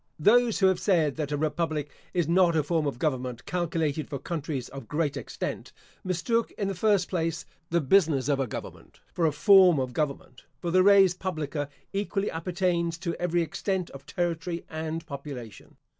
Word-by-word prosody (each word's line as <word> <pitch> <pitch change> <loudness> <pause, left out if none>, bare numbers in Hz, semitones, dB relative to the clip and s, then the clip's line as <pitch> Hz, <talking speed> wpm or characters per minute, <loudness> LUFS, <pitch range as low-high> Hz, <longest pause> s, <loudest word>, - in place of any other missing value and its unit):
Those 230 +7 +4
who 195 - +3
have 190 -1 +3
said 165 -9 +2
that 150 -2 -3
a 145 - 0
republic 155 -1 -1 0.2
is 175 -4 0
not 170 0 +4
a 155 - +3
form 160 0 0
of 140 - -3
government 125 -4 -2
calculated 160 -4 -1
for 140 - -3
countries 145 -4 -4
of 135 0 -9
great 150 -1 -1
extent, - - -5 0.3
mistook, 190 +6 0
in 200 - -2
the 195 - -1
first 195 0 +2
place, 165 -3 -2 0.2
the 170 0 +2
business 150 -4 +3
of 140 -2 +1
a 135 - 0
government, - - -9
for 165 -2 +2
a - - +2
form 185 0 +6
of 130 -1 -2
government; 140 -4 -3 0.2
for 170 - -3
the 185 +1 +5
res 195 -2 +6
publica 155 -6 -3 0.2
equally 200 0 -1
appertains 170 0 -1
to 170 -1 -3
every 175 -1 +1
extent 185 +2 -2
of 140 +1 -12
territory 170 +1 -2
and 160 +1 -4
population. 140 -7 -9
165 Hz, 175 wpm, -27 LUFS, 145-180 Hz, 0.3 s, form